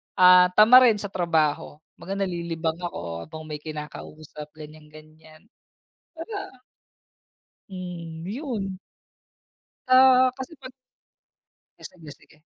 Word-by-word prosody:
ah, 180 0 +7
tamarin 235 +1 +7
sa 205 - -6
trabaho. 160 -4 -1 0.2
'Baga, 195 - -6
nalilibang 170 -4 -3
ako 85 - -6
habang 155 0 -10
may 150 - -5
kinakausap, 150 0 -9
ganyan-ganyan. 155 +1 -15 0.7
'Baga, 395 +5 -7 1.3
hmm, 175 -4 -8
'yon. 210 -7 -5 1.1
Ah, 255 0 +6
kasi 265 +5 -8
'pag 260 -2 -12 1.1
ay, - - -17
sige, 170 -4 -15
sige. - - -23
170 Hz, 95 wpm, -24 LUFS, 155-215 Hz, 1.3 s, ah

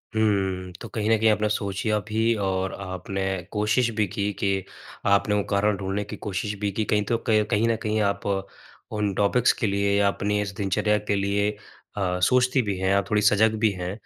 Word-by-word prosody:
हुँ, 95 -4 0
तो - - -6
कहीं 110 -1 -2
न 115 - +5
कहीं 110 +1 +4
आपने 105 0 +2
सोचिया 105 +1 -1
भी 110 +2 +1
और 95 0 -1
आपने 95 +1 -5 0.3
कोशिश 105 +3 +1
भी 105 -1 +2
की 100 +3 -2
कि, 100 -1 -1 0.4
आपने 100 +1 +3
वो 100 - +1
कारण 100 0 +2
ढूँढ़ने 95 +2 -2
की 105 - -7
कोशिश 105 +1 -3
भी 100 -1 -1
की 110 +2 -2
कहीं 105 -1 +3
तो 115 - +1
क 110 -1 +4
कहीं 105 +2 +2
न 115 - +2
कहीं 110 -1 0
आप 100 -1 -1 0.7
उन 105 -2 -1
टॉपिक्स 110 +5 +3
के 115 - -1
लिए 100 0 +1
या 100 - +4
अपनी 105 +1 0
इस 100 -1 -3
दिनचर्या 105 +1 +1
के 100 - +3
लिए 100 +1 +1 0.5
अ, 90 -2 0
सोचती 125 +6 +3
भी 100 -4 -2
हैं 95 +1 +1
आप 100 - 0
थोड़ी 105 -2 +2
सजग 105 +1 +4
भी 110 -1 +3
हैं। 90 -2 -4
105 Hz, 205 wpm, -25 LUFS, 100-110 Hz, 0.7 s, न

